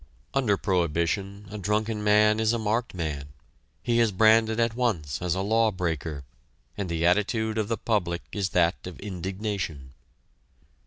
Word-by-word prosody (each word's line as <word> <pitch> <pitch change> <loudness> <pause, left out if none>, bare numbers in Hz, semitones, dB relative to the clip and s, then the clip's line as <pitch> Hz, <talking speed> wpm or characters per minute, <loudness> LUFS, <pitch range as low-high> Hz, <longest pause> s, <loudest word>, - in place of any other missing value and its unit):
Under 120 -7 +2
prohibition, 95 +3 -1
a 105 - -6
drunken 105 +2 -1
man 105 +1 +4
is 110 +1 +2
a - - +1
marked 110 0 -1
man 75 -5 -3 0.6
he 120 -1 +2
is 115 -2 +3
branded 110 +2 +4
at 115 -1 +2
once 90 - -1
as 90 -1 0
a 95 - -1
law 110 +3 +3
breaker, 80 -6 -3 0.5
and 100 -3 -4
the 85 0 0
attitude 110 +4 +1
of 105 - 0
the 115 0 -1
public 90 -6 -1
is 100 -2 -1
that 90 +1 +1
of 90 - -9
indignation. 95 -7 -4
100 Hz, 155 wpm, -26 LUFS, 85-110 Hz, 0.6 s, man